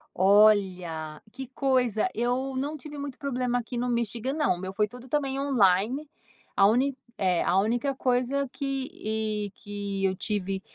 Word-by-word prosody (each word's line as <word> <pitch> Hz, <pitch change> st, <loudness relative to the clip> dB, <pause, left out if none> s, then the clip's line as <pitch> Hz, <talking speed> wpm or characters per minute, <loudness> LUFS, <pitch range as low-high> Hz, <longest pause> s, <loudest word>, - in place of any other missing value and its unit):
Olha, 185 Hz, -6 st, +3 dB
que 265 Hz, +1 st, -7 dB
coisa, 250 Hz, -4 st, +1 dB
eu 250 Hz, +3 st, -1 dB
não 290 Hz, +4 st, -2 dB
tive 295 Hz, 0 st, -9 dB
muito 280 Hz, -2 st, -6 dB
problema 250 Hz, -3 st, -1 dB
aqui 245 Hz, +1 st, -4 dB
no 245 Hz, +1 st, -1 dB
Michigan 235 Hz, +2 st, -1 dB
não. 300 Hz, -, +2 dB
O -, -, -9 dB
meu 190 Hz, 0 st, -5 dB
foi 210 Hz, +2 st, +1 dB
tudo 250 Hz, +4 st, -12 dB
também 275 Hz, -1 st, -1 dB
on-line, 245 Hz, +1 st, +2 dB, 0.5 s
a 195 Hz, -, +6 dB
úni 260 Hz, +5 st, +2 dB, 0.2 s
é. 185 Hz, -3 st, +2 dB
A 180 Hz, -, +2 dB
única 245 Hz, +6 st, 0 dB
coisa 255 Hz, +2 st, +1 dB
que 275 Hz, -1 st, -3 dB
e 215 Hz, -1 st, -2 dB
que 200 Hz, -1 st, -4 dB
eu 190 Hz, 0 st, +1 dB
tive 195 Hz, -2 st, -2 dB
240 Hz, 160 wpm, -27 LUFS, 200-265 Hz, 0.5 s, a